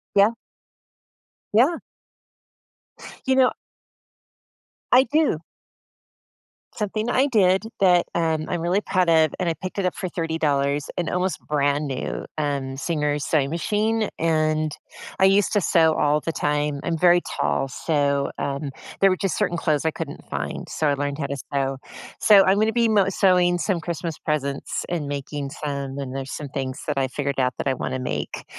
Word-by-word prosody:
Yeah. 200 +2 +6 1.2
Yeah. 265 +10 +4 1.5
You 265 - +4
know 260 -1 +5 1.4
I 255 +1 +8
do. 300 - +1 1.4
Something 215 +2 -2
I 265 +3 +3
did 195 -6 +3 0.2
that, 180 -3 +4
um, 160 -2 0
I'm 175 -2 -2
really 180 +4 +1
proud 185 -4 +1
of- 160 -2 +4
and 180 -2 0
I - - +1
picked 185 +3 -6
it 190 - 0
up 180 - 0
for 185 - -4
$30- 150 -4 -1
an 175 -3 -1
almost 180 +1 -1
brand 145 0 +1
new, 130 - -4
um, 140 -3 -2
Singer 150 -1 -1
sewing 145 -1 +1
machine, 215 +6 0
and 155 -1 +1 0.5
I 190 - +6
used 195 0 +3
to 205 - +3
sew 160 -2 +4
all 150 +1 +2
the 165 - -3
time. 145 -1 -1
I'm 165 -1 -1
very 175 +1 +5 0.2
tall, 135 - +1
so, 140 0 0
um, 140 +1 -3 0.3
there 195 - +6
were 185 - +2
just 195 -1 -1
certain 180 -5 0
clothes 155 -2 0
I 160 - +2
couldn't 155 -2 -7
find, - - -4
so 155 - -1
I 145 - +3
learned 140 0 -2
how 140 - -1
to 140 - -4
sew. 135 -1 -1 0.4
So, 205 -2 +7
I'm 195 +2 +3
gonna 220 +1 +2
be 235 -1 +3
mo 205 -3 +3
sewing 180 -2 +3
some 180 0 0
Christmas 165 -1 -4
presents 140 -3 -2
and 165 -5 -2
making 140 0 -4
some, 140 -2 -4
and 135 -2 -5
there's 135 0 -5
some 145 -2 -6
things 135 0 -4
that 150 -2 -2
I 135 - +2
figured 140 +1 -3
out 130 -1 +1
that - - -3
I 135 - +2
wanna 130 0 -3
make, 75 -12 -4
160 Hz, 170 wpm, -23 LUFS, 140-185 Hz, 1.5 s, I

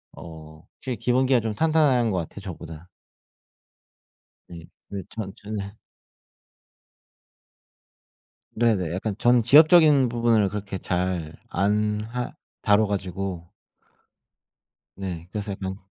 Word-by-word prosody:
어 80 -1 -12
확실히 125 -3 -5
기본기가 125 +3 +2
좀 110 -1 -3
탄탄한 140 -5 +2
것 95 - -1
같아요 85 +4 -7
저보다. 85 -3 -9 1.6
네. 85 -2 -11 0.2
근데 100 -1 -5
전 105 -4 -6
저는 105 0 -7 3.0
네네. 110 -8 +1
약간 100 +3 -3
전 120 0 +4
지엽적인 150 0 +6
부분을 115 -4 +2
그렇게 100 -2 -5
잘 90 -4 -2 0.2
안 105 +3 0
하 125 0 -4 0.3
다뤄 105 +1 +3
가지고 95 -3 -4 1.5
네. 90 -3 -6
그래서 105 -1 -4
약간 95 -1 -5
105 Hz, 205 characters per minute, -24 LUFS, 90-120 Hz, 3.0 s, 지엽적인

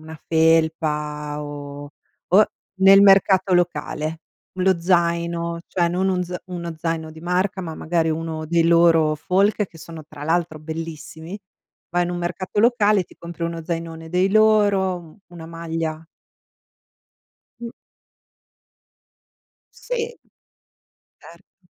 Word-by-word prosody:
una 160 0 -10
felpa 155 -2 +1
o 145 0 -8 0.4
o 200 +4 +6 0.4
nel 195 +1 +8
mercato 195 -1 +5
locale. 165 -2 -1 0.4
Lo 185 -1 +2
zaino, 170 -1 0
cioè 175 -2 +1
non 185 +3 0
un 180 -1 0
z 180 +1 -7 0.2
uno 170 -2 -5
zaino 160 0 -3
di 160 0 -12
marca, 185 +3 -1
ma 165 -2 -6
magari 165 0 0
uno 160 0 -4
dei 165 +1 +2
loro 165 -2 +4
folk, 195 +7 +1
che 165 -2 -17
sono, 160 -1 -10
tra 145 -1 -9
l'altro, 165 0 0
bellissimi. 160 +3 -7 0.5
Vai 175 +1 +1
in 175 - -3
un 175 - -3
mercato 180 +3 -2
locale 215 -3 +4
e - - -3
ti - - -20
compri 170 0 -7
uno 165 0 -4
zainone 165 -1 -5
dei 180 +2 +2
loro, 205 -3 +3
un 165 -3 -13
una 170 -2 -10
maglia 165 -1 -4 1.6
Mh. 235 -1 -6 2.1
Sì. 475 -1 -4 1.0
Certo. - - -18
170 Hz, 125 wpm, -22 LUFS, 160-185 Hz, 2.1 s, nel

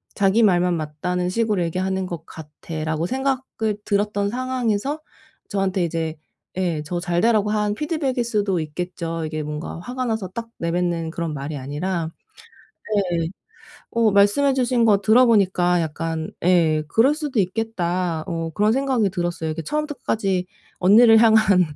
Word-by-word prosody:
자기 200 +3 +3
말만 180 -4 +3
맞다는 170 +4 -2
식으로 215 -2 0
얘기하는 185 +2 -2
것 170 -2 -7
같아.'라고 160 +1 -5
생각이 260 -3 -1
들었던 205 0 0
상황에서 255 +2 -1 0.5
저한테 195 -2 0
이제 165 -1 -3 0.4
예 170 -5 0
저 175 +3 -3
잘 175 0 0
되라고 215 -2 +3
한 210 -1 0
피드백일 285 -4 -1
수도 205 -6 0
있겠죠. 165 +1 -4
이게 155 0 -4
뭔가 150 +2 -5
화가 255 +3 -4
나서 220 -4 -2
딱 230 +4 -6
내뱉는 170 -1 -1
그런 165 -2 -3
말이 145 +2 -5
아니라 160 +5 -3 1.1
네. 165 - 0 0.7
어 230 -1 +3
말씀해 205 +8 +4
주신 250 -2 +2
거 210 -3 +5
들어보니까 200 -6 +4
약간 160 0 -3
예 165 -4 +3
'그럴 245 - +4
수도 295 -6 -3
있겠다.' 180 -5 -1
어 165 -3 -3
그런 210 +1 +3
생각이 260 -4 +1
들었어요. 175 -3 -2
이게 160 +1 -4
처음부터 300 - -2
끝까지 190 -4 -1 0.3
언니를 225 +4 +7
향한 215 -5 +5
190 Hz, 320 characters per minute, -22 LUFS, 165-225 Hz, 1.1 s, 언니를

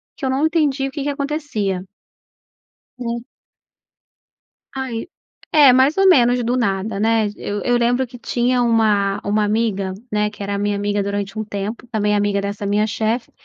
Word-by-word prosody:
que 275 - -5
eu - - 0
não 270 +4 +1
entendi 295 -4 +1
o - - -7
que 285 0 -4
que 290 - -1
acontecia. 280 -10 -2 1.1
Hum. 235 -1 -3 1.5
Ai, 260 0 -4 0.4
é 290 -5 +7
mais 265 +5 +4
ou 390 0 +5
menos 245 -7 +5
do 240 +2 0
nada, 200 -3 -1
né, 225 0 +2
eu 205 0 -4
eu 245 - +2
lembro 245 +2 +1
que 245 0 -13
tinha 245 +1 0
uma 210 -4 +2
uma 210 +1 +1
amiga, 205 -3 0 0.2
né, 210 0 +1
que 210 -1 -9
era 200 0 -3
a - - -1
minha 205 0 0
amiga 205 0 -1
durante 200 +1 -3
um - - -1
tempo 210 +3 -5
também 210 -3 0
amiga 205 -1 +1
dessa 200 0 -4
minha 205 +1 +2
chefe, 220 +2 -2
225 Hz, 175 wpm, -20 LUFS, 205-255 Hz, 1.5 s, é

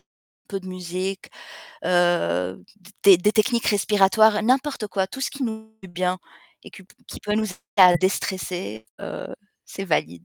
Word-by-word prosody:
un - - -43 0.4
peu 195 -1 -4
de 185 - -12
musique, 185 +1 -5 0.5
heu, 95 - +1
d 190 0 -18
des 195 -3 +9
des 210 +4 +2
techniques 235 +2 +1
respiratoires, 210 +1 +3
n'importe 260 0 0
quoi, 190 -1 -1
tout 265 - -9
ce - - -1
qui 280 -1 -7
nous 220 -1 -6
fait 190 - -11
du - - -18
bien 180 +1 -1 0.5
et - - -11
qui 195 - -13 0.3
qui - - -9
peut 210 0 -2
nous 220 - +1
aider 185 - -8 0.2
à 180 -2 +8
déstresser, 180 - -3
heu, - - -6 0.4
c'est 195 - -7
valide. 85 - -1
190 Hz, 175 wpm, -23 LUFS, 175-215 Hz, 0.5 s, des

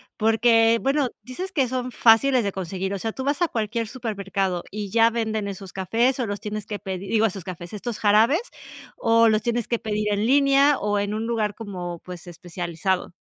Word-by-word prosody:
porque 225 +1 +4
bueno, 275 +1 +1
dices 360 +10 -6
que 275 -8 +1
son 255 0 -3
fáciles 245 +2 +4
de 200 - -1
conseguir. 190 +1 -4
O 200 - -3
sea, 225 +3 -3
tú 265 - -5
vas 285 +3 -1
a 345 - +4
cualquier 225 -2 -2
supermercado, 195 -6 -3
y 205 -1 -6
ya 230 +1 +5
venden 220 -2 -2
esos 195 -1 -8
cafés, 230 +8 +1
¿o 245 - -1
los 205 0 -4
tienes 210 -1 -5
que 210 - -4
pedir? 190 -1 -6
Digo, 225 -1 +3
esos 195 -4 -3
cafés, 175 0 -8
estos 220 +2 -5
jarabes, 225 - +4 0.5
¿o 230 0 +4
los 215 -1 +3
tienes 235 0 -1
que 235 - -1
pedir 210 -1 -1
en 205 +2 0
línea, 275 +1 +4
o 205 0 0
en 205 +1 -2
un 220 +1 -3
lugar 220 -3 -1
como, 180 -6 -6
pues, 180 -1 -9
especializado? 175 +1 -3
215 Hz, 200 wpm, -24 LUFS, 195-235 Hz, 0.5 s, ya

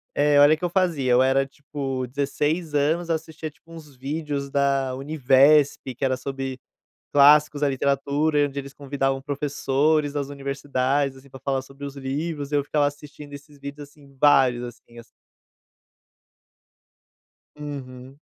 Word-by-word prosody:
É. 145 0 +4
Olha 145 +2 +7
o - - -14
que 180 - -16
eu - - 0
fazia. 165 -9 +1
Eu 125 +1 +5
era, 135 +1 +3
tipo, 135 -2 -5
16 145 +4 -2
anos, 160 +4 +1
assistia, 160 -1 -3
tipo, 165 +2 -22
uns 150 -4 -12
vídeos 140 +1 -4
da 135 -2 +1
UNIVESP, 135 -1 +3
que 135 - -2
era 130 -1 0
sobre 135 0 -5 0.5
clássicos 150 +1 +6
da 145 - +3
literatura, 140 +3 0
e 145 - +4
onde 140 0 -6
eles 140 0 -9
convidavam 135 -1 -2
professores 145 +1 0
das 145 -2 -2
universidades, 140 0 -1
assim, 135 +1 -17
pra 135 0 -12
falar 135 0 -1
sobre 135 +1 -11
os 140 0 -7
livros. 145 +2 -4
Eu 145 -1 +1
ficava 145 0 +1
assistindo 145 0 -9
esses 145 +1 -12
vídeos, 140 +1 -8
assim, 140 -2 -20
vários 130 -4 +4
assim 120 -1 -11
assim. 115 - -13 2.5
Uhum. 135 -3 -8
140 Hz, 150 wpm, -24 LUFS, 135-150 Hz, 2.5 s, Olha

